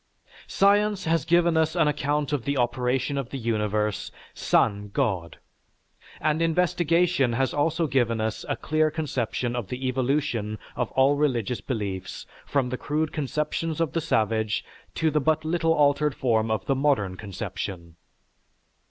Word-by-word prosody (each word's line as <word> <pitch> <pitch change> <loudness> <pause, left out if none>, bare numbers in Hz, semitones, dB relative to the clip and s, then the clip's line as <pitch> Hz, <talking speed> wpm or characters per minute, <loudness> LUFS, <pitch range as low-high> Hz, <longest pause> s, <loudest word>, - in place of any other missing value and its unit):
Science 205 0 +3
has 165 -1 +1
given 170 0 +3
us 160 +1 +2
an 165 -3 +3
account 150 0 0
of 140 -5 -1
the 140 +2 -1
operation 125 +3 0
of 130 -3 -5
the 135 - -5
universe 105 -3 -1 0.2
sans 105 -1 +1
God, 100 -10 -1 0.8
and 155 +1 +1
investigation 170 -4 +2
has 130 +2 0
also 160 +3 +1
given 120 -5 +1
us 110 0 -2
a - - +1
clear 155 0 +1
conception 130 -6 -2
of 120 -5 -3
the 125 +3 -4
evolution 130 -4 -1 0.2
of 125 -2 -1
all 135 +2 +4
religious 125 -5 0
beliefs 100 -6 -4 0.2
from 135 -3 0
the 130 - -3
crude 150 +3 -1
conceptions 150 +2 -2
of 165 -4 0
the 165 - 0
savage 110 - 0 0.3
to 160 -1 +1
the 150 0 +1
but 155 +2 +1
little 165 0 +1
altered 145 -1 +2
form 115 -3 +1
of 110 -1 -1
the 135 - +2
modern 130 -9 +1
conception. 90 -3 -6
135 Hz, 150 wpm, -25 LUFS, 115-155 Hz, 0.8 s, all